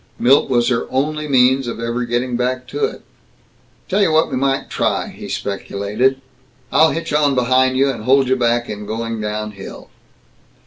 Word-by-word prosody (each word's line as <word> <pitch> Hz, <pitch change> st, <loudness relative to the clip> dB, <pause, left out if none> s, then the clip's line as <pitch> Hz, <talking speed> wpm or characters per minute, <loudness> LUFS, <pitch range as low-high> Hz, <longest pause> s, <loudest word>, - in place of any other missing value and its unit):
Milt 135 Hz, +3 st, +4 dB
was 120 Hz, -2 st, +2 dB
her 125 Hz, -2 st, -1 dB
only 150 Hz, +3 st, -1 dB
means 130 Hz, -1 st, +3 dB
of 115 Hz, -, -5 dB
ever 115 Hz, +1 st, -2 dB
getting 120 Hz, +1 st, -1 dB
back 125 Hz, +1 st, -1 dB
to 435 Hz, -, 0 dB
it. 435 Hz, -, -7 dB, 0.8 s
"Tell 195 Hz, +2 st, +1 dB
you 185 Hz, -5 st, +3 dB
what 160 Hz, +1 st, +2 dB
we -, -, -1 dB
might 135 Hz, +1 st, 0 dB
try," -, -, -1 dB
he -, -, -10 dB
speculated. 100 Hz, +6 st, -1 dB, 0.5 s
"I'll 160 Hz, 0 st, +5 dB
hitch 165 Hz, -1 st, -4 dB
on 145 Hz, -2 st, +2 dB
behind 130 Hz, +1 st, +2 dB
you, 135 Hz, +1 st, +3 dB
and 115 Hz, -5 st, -7 dB
hold 130 Hz, -1 st, +3 dB
back 120 Hz, 0 st, +1 dB
in 105 Hz, -1 st, -7 dB
going 115 Hz, 0 st, -4 dB
down 105 Hz, 0 st, -3 dB
hill." 100 Hz, -2 st, -11 dB
125 Hz, 175 wpm, -18 LUFS, 115-135 Hz, 0.8 s, I'll